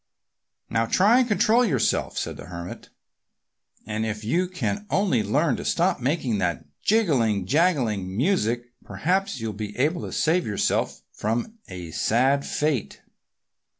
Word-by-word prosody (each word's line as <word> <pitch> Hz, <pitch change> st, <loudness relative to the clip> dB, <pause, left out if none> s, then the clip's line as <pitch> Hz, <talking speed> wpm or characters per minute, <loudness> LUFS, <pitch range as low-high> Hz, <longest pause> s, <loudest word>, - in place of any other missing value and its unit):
"Now 115 Hz, 0 st, 0 dB
try 215 Hz, -, +5 dB
to 250 Hz, -, 0 dB
control 225 Hz, +2 st, +3 dB
yourself," 140 Hz, -, 0 dB
said -, -, -3 dB
the -, -, -10 dB
Hermit. 85 Hz, 0 st, -8 dB, 1.0 s
"And 110 Hz, 0 st, -2 dB
if 110 Hz, -1 st, -3 dB
you 170 Hz, +12 st, +1 dB
can 200 Hz, +3 st, -3 dB
only 190 Hz, -, +2 dB
learn 140 Hz, +10 st, +1 dB
to -, -, -5 dB
stop 175 Hz, -3 st, +1 dB
making 125 Hz, -5 st, 0 dB
that 85 Hz, -7 st, -1 dB, 0.2 s
jingling, 130 Hz, -, +2 dB
jangling 115 Hz, -, +1 dB
music 120 Hz, -, 0 dB
perhaps 190 Hz, -1 st, -1 dB
you'll 110 Hz, -1 st, -3 dB
be 105 Hz, 0 st, -6 dB
able 155 Hz, +7 st, +1 dB
to -, -, -6 dB
save 170 Hz, +3 st, +1 dB
yourself 105 Hz, -2 st, -1 dB
from 120 Hz, -, -3 dB
a 90 Hz, -3 st, -8 dB
sad 125 Hz, -, +2 dB
fate." 150 Hz, -, -1 dB
125 Hz, 140 wpm, -25 LUFS, -, 1.0 s, try